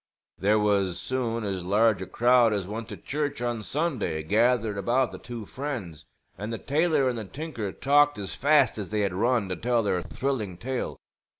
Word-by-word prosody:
There 105 +3 +3
was 100 -4 +1
soon 115 -2 -2
as 95 -3 -3
large 105 +2 +3
a 95 - -5
crowd 120 -2 +4
as 100 -3 -2
went 110 +2 -5
to - - -7
church 145 0 -3
on 120 -2 -2
Sunday 130 - -2
gathered 110 +3 +2
about 120 +6 +1
the - - -9
two 120 -3 -7
friends; 115 - -6 0.3
and 105 +3 -4
the 115 - -2
tailor 150 0 +2
and 120 -2 -1
the 110 - -5
tinker 115 -4 -5
talked 145 +2 +3
as 100 -2 -5
fast 140 -5 +3
as 100 - -5
they 105 0 0
had 100 -3 0
run, 115 +2 +1
to 90 - -1
tell 120 +1 +1
their 90 -3 0
thrilling 110 -6 -3
tale. 130 +6 -3
115 Hz, 190 wpm, -27 LUFS, 100-130 Hz, 0.3 s, crowd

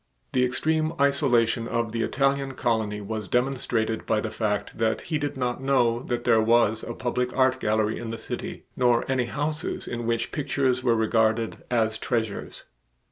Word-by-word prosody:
The 125 - +3
extreme 155 +5 +1
isolation 125 -5 +2
of 115 -1 -1
the 115 0 -2
Italian 135 +2 0
colony 110 -4 0
was 105 0 -4
demonstrated 125 -3 0
by 110 - +2
the 110 0 -3
fact 105 -1 -2
that 110 -1 +1
he 155 -2 -2
did 145 -1 -3
not 125 -1 -2
know 125 -4 +2
that 120 -2 -3
there 115 -2 +4
was 110 -1 +3
a 120 - -6
public 125 0 -2
art 130 0 +3
gallery 110 -1 0
in 115 - -5
the 115 - -4
city 110 - -5
nor 120 -2 +3
any 130 -2 +1
houses 150 +5 -3
in 120 -1 -4
which 115 -1 -1
pictures 135 -3 0
were 120 -2 +3
regarded 110 0 +1
as 110 -2 +1
treasures. 110 -4 -3
120 Hz, 170 wpm, -26 LUFS, 110-130 Hz, -, there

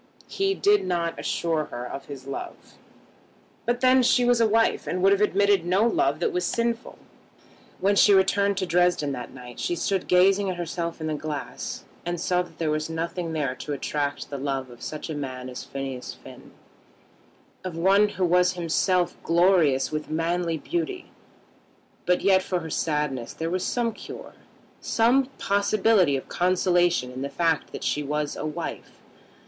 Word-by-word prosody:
He 390 0 0
did 410 +2 +3
not 170 -2 -1
assure 160 -2 -1
her 120 0 -6
of 135 - -7
his 135 -2 -9
love, 135 - -7 0.9
but 240 +1 0
then 260 0 +5
she 250 0 +3
was 245 -1 +3
a 225 - +5
wife, 225 +1 +2
and 180 0 -2
would 195 - +6
have 200 0 +3
admitted 200 -2 +3
no 185 +5 +2
love 155 -10 +1
that - - 0
was 180 - 0
sinful. 235 +5 -2 0.8
When 200 +1 +2
she 205 - +6
returned 200 +1 +3
to 185 - 0
Dresden 175 -4 +2
that 125 -2 -6
night 125 -2 -11
she 175 - -1
stood 190 +2 -1
gazing 190 +2 +4
at 185 - -2
herself 170 -1 -4
in - - -3
the 155 - -1
glass 150 -1 -5 0.2
and 175 0 -3
saw 180 +1 +1
that 170 -2 -10
there 160 -2 0
was 155 +1 -2
nothing 165 +1 -3
there 145 -5 -1
to 145 - -5
attract 145 +1 -3
the 140 - -4
love 135 -2 -3
of 120 - -14
such 155 - -5
a 160 - -4
man 130 -3 -5
as 125 - -7
Phineas 135 -2 -6
Finn, - - -14 1.1
of 180 -3 -5
one 195 +4 +4
who 185 -2 -1
was 180 +1 +3
himself 175 +1 +1
glorious 165 -6 +3
with 155 0 -4
manly 165 +1 -1
beauty; 350 - -4 1.0
but 180 0 +3
yet 190 -1 +4
for 180 -1 -2
her 160 -1 -7
sadness 150 -7 -1
there 165 +1 -3
was 185 0 -1
some 235 -2 0
cure, - - -10 0.5
some 245 +4 +3
possibility 200 -5 +2
of 130 - -8
consolation 175 -6 +2
in 130 +1 -7
the 140 - -3
fact 165 -1 0
that - - -7
she 150 - 0
was 150 +1 -2
a - - -4
wife. 160 +2 -6
175 Hz, 175 wpm, -25 LUFS, 150-195 Hz, 1.1 s, would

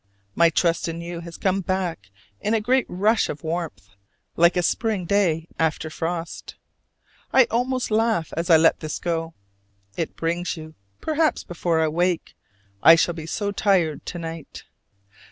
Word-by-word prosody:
My 170 +6 +5
trust 170 +1 +1
in 165 0 -4
you 170 0 -6
has 170 -1 -9
come 195 0 0
back 180 - -3 0.3
in 215 - 0
a - - +2
great 255 +4 +1
rush 210 +4 +2
of 150 - -6
warmth, 160 - -4 0.5
like 170 +2 +4
a 180 - +2
spring 210 0 0
day 170 -4 +1
after 160 0 0
frost. 165 +1 -4 0.8
I 260 - +7
almost 250 +1 0
laugh 220 -6 +1
as 165 +2 -2
I 165 - +8
let 165 +1 +4
this 155 -2 -4
go. 165 -1 -3 0.6
It 165 - -3
brings 170 +2 -2
you, 155 0 -9 0.3
perhaps 315 0 +1
before 170 -1 -1
I 160 - +3
wake: 175 +2 0 0.5
I 165 - +9
shall 170 +1 +1
be 160 -1 -8
so 205 +4 -2
tired 185 -7 +1
to 175 - -4
night. 165 -2 -7
170 Hz, 160 wpm, -23 LUFS, 165-200 Hz, 0.8 s, I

